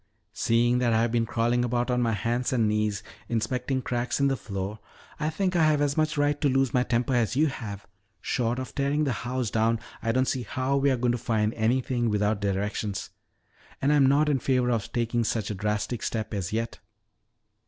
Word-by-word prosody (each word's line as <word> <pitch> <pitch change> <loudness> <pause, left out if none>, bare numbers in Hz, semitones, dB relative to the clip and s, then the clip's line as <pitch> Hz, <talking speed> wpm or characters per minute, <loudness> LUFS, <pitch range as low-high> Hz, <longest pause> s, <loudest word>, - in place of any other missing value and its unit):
"Seeing 120 +1 +2
that 120 -2 +2
I 110 +1 +3
have 120 - 0
been 115 -1 +1
crawling 120 +1 +1
about 120 +1 0
on 125 0 +1
my 115 -2 +1
hands 120 +4 -1
and 115 -4 +2
knees 105 0 0 0.3
inspecting 125 +3 -1
cracks 120 +2 -1
in 140 0 +3
the 135 - +1
floor, 100 -2 -5 0.4
I 155 0 0
think 185 +3 -1
I 165 - +4
have 155 -1 +3
as 145 -1 +1
much 155 -1 +1
right 145 0 +1
to 145 - +3
lose 135 -1 +1
my 125 - +3
temper 125 +1 0
as 120 -1 +1
you 150 +4 +4
have. 105 -8 -5 0.3
Short 120 0 -1
of 130 -4 -5
tearing 140 +2 +1
the 140 - +1
house 125 0 -2
down, 115 +1 +2 0.2
I 115 - 0
don't 130 +2 +2
see 130 - -1
how 130 +4 -1
we 140 +1 +3
are 130 - +2
going 120 0 +1
to 120 - -1
find 110 -2 0
anything 120 +1 +1
without 105 0 +1
directions. 100 0 -2 0.7
And 140 +2 +2
I - - +4
am 140 -2 +5
not 145 +3 +4
in 145 -3 +2
favor 125 -1 +1
of 115 -4 -2
taking 120 -1 0
such 110 -2 -1
a - - -1
drastic 105 +3 -2
step 110 -1 -3
as 95 -4 -3
yet." 115 +1 -3
120 Hz, 215 wpm, -27 LUFS, 110-130 Hz, 0.7 s, am